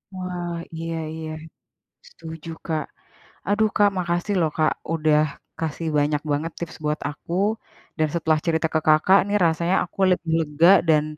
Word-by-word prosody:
Wah, 180 Hz, -1 st, -4 dB, 0.2 s
iya 165 Hz, 0 st, -4 dB, 0.2 s
iya. 160 Hz, -1 st, -6 dB, 0.8 s
Setuju, 160 Hz, 0 st, -9 dB, 0.2 s
Kak. 155 Hz, -3 st, -1 dB, 0.7 s
Aduh, 215 Hz, +1 st, +3 dB
Kak, 205 Hz, -1 st, +5 dB
makasih 175 Hz, +2 st, -1 dB
lho, 165 Hz, -, +3 dB
Kak, 155 Hz, 0 st, +3 dB, 0.2 s
udah 155 Hz, -1 st, +3 dB, 0.4 s
kasih 160 Hz, +1 st, -3 dB
banyak 145 Hz, 0 st, +1 dB
banget 155 Hz, +3 st, -1 dB
tips 170 Hz, 0 st, -6 dB
buat 150 Hz, +1 st, 0 dB
aku. 150 Hz, +3 st, -8 dB, 0.6 s
Dan, 155 Hz, 0 st, +2 dB
setelah 160 Hz, -2 st, +2 dB
cerita 160 Hz, -1 st, +1 dB
ke 160 Hz, -, 0 dB
Kakak 155 Hz, +6 st, +6 dB
nih, 205 Hz, +1 st, +2 dB
rasanya 170 Hz, +3 st, +1 dB
aku -, -, -20 dB
lebih 170 Hz, -2 st, 0 dB
lega, 160 Hz, +2 st, +3 dB, 0.2 s
dan, 150 Hz, -1 st, +5 dB
165 Hz, 150 wpm, -23 LUFS, 155-175 Hz, 0.8 s, Kakak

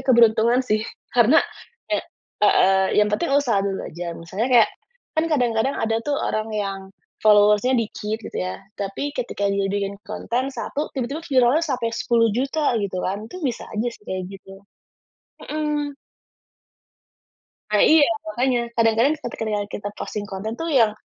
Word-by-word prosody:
keberuntungan 235 Hz, 0 st, +4 dB
sih 215 Hz, -3 st, +1 dB, 0.3 s
karena, 245 Hz, +6 st, +6 dB, 0.5 s
eee, -, -, +2 dB, 0.4 s
heeh, 190 Hz, -2 st, +4 dB
yang 210 Hz, 0 st, +4 dB
penting 340 Hz, +11 st, 0 dB
usaha 235 Hz, -8 st, +2 dB
dulu 195 Hz, -1 st, -2 dB
aja 170 Hz, +1 st, -6 dB
misalnya 190 Hz, +8 st, -3 dB
kayak, 240 Hz, -3 st, +6 dB, 0.4 s
kan 315 Hz, 0 st, +1 dB
kadang-kadang 250 Hz, -3 st, +1 dB
ada 225 Hz, 0 st, 0 dB
tuh 290 Hz, -1 st, 0 dB
orang 215 Hz, 0 st, -2 dB
yang, 200 Hz, -2 st, -2 dB, 0.4 s
followers-nya 210 Hz, +4 st, +5 dB
dikit 220 Hz, -1 st, -3 dB
gitu 225 Hz, -, -10 dB
ya 90 Hz, +1 st, -3 dB, 0.2 s
tapi 205 Hz, +9 st, -4 dB
ketika 235 Hz, -6 st, -2 dB
dia 200 Hz, -1 st, 0 dB
bikin 200 Hz, 0 st, -2 dB
konten 240 Hz, +5 st, -3 dB
1 290 Hz, +2 st, -4 dB
tiba-tiba 275 Hz, +5 st, -4 dB
viralnya 265 Hz, +1 st, +3 dB
sampai 245 Hz, -7 st, -1 dB
10.000.000 245 Hz, +6 st, +1 dB
gitu 190 Hz, -2 st, -3 dB
kan 200 Hz, +4 st, -3 dB
itu 365 Hz, -, -7 dB
bisa 245 Hz, -, -3 dB
aja 220 Hz, +3 st, -1 dB
sih -, -, -19 dB
kayak 185 Hz, -2 st, -4 dB
gitu, 195 Hz, 0 st, -12 dB, 0.8 s
mhm. 295 Hz, -2 st, -2 dB, 1.8 s
Eee, 210 Hz, -, +5 dB, 0.2 s
iya 290 Hz, -, +6 dB, 0.2 s
makanya 260 Hz, -5 st, 0 dB, 0.2 s
kadang-kadang 230 Hz, +4 st, +4 dB
ketika 240 Hz, -4 st, -5 dB, 0.2 s
kita 205 Hz, 0 st, -5 dB
posting 210 Hz, -1 st, -4 dB
konten 205 Hz, +3 st, -5 dB
tuh 330 Hz, -1 st, -3 dB
yang, 225 Hz, -5 st, +4 dB
225 Hz, 145 wpm, -22 LUFS, 205-260 Hz, 1.8 s, karena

